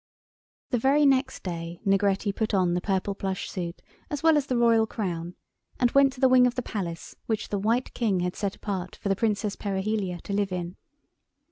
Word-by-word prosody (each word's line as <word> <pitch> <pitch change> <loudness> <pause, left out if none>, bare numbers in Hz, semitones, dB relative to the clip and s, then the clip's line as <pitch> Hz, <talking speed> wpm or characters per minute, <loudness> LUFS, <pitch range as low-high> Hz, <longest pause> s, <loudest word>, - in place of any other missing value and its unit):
The 245 - +2
very 280 +5 +4
next 265 -1 +2
day 170 -1 -5
Negretti 200 +1 +2
put 220 -2 0
on 180 -2 +2
the 175 - 0
purple 195 +1 -1
plush 190 -1 -3
suit 175 -2 -5 0.3
as 295 0 -4
well 325 -1 +6
as 290 -2 +1
the 250 - 0
Royal 230 -2 +4
Crown, 175 -6 -4 0.4
and 245 -1 +3
went 275 -1 +5
to 255 - -13
the 265 - +5
wing 255 -1 +6
of 245 - -2
the 250 - -2
Palace 170 -8 -5
which 220 -2 -2
the 205 - -1
White 230 +5 0
King 205 -7 0
had 180 +1 -2
set 200 -2 -2
apart 190 -3 -4
for 200 - -4
the 195 - +3
Princess 210 -1 0
Perihelia 195 -2 -2
to 200 - -5
live 200 -1 0
in. 180 0 -4
205 Hz, 205 wpm, -26 LUFS, 185-240 Hz, 0.4 s, well